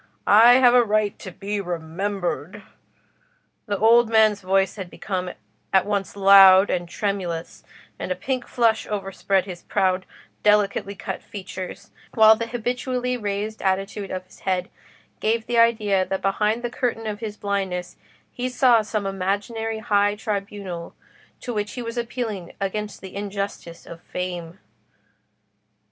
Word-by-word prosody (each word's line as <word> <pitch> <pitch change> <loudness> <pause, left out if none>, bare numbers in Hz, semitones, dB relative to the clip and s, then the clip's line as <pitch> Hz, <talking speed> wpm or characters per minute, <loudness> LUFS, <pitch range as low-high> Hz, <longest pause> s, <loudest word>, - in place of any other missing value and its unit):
I 225 +4 +8
have 250 -2 +6
a 250 -1 +6
right 215 -2 0
to 190 - -8
be 200 +3 -4
remembered." 180 +2 -4 1.0
The 205 -1 -1
old 230 +2 +5
man's 220 -2 +4
voice 190 0 +1
had 190 -4 -7
become 185 -1 -4 0.4
at 190 -1 +4
once 200 -2 -2
loud 195 -1 +7
and 175 -1 -2
tremulous, 180 -5 -3 0.4
and - - -4
a - - +1
pink 250 +6 -3
flush 230 -2 +1
overspread 195 -1 -1
his 180 -3 -8
proud, 185 -2 0 0.3
delicately 205 -1 +2
cut 195 - -5
features, 185 -2 -8 0.2
while 220 -1 +8
the 230 +1 -4
habitually 250 +2 -2
raised 210 -1 -3
attitude 195 +1 -1
of 185 0 -5
his - - -19
head 185 -1 -2 0.5
gave 225 +1 0
the 240 -1 +1
idea 215 -5 +3
that 190 +1 -4
behind 210 +4 0
the 240 - -3
curtain 240 -2 -2
of 210 -1 -4
his 215 -2 -6
blindness 190 -3 -3 0.4
he 250 +1 -3
saw 250 -2 +4
some 215 -1 -3
imaginary 205 +4 -2
high 205 -1 +1
tribunal 200 -4 -5 0.5
to 245 - -4
which 210 -1 -3
he 245 - -5
was 230 0 -5
appealing 230 -6 -4
against 210 +1 -4
the 190 0 -10
injustice 200 -4 -5
of 165 -1 -11
Fame. 175 -2 -5
205 Hz, 145 wpm, -23 LUFS, 190-220 Hz, 1.0 s, I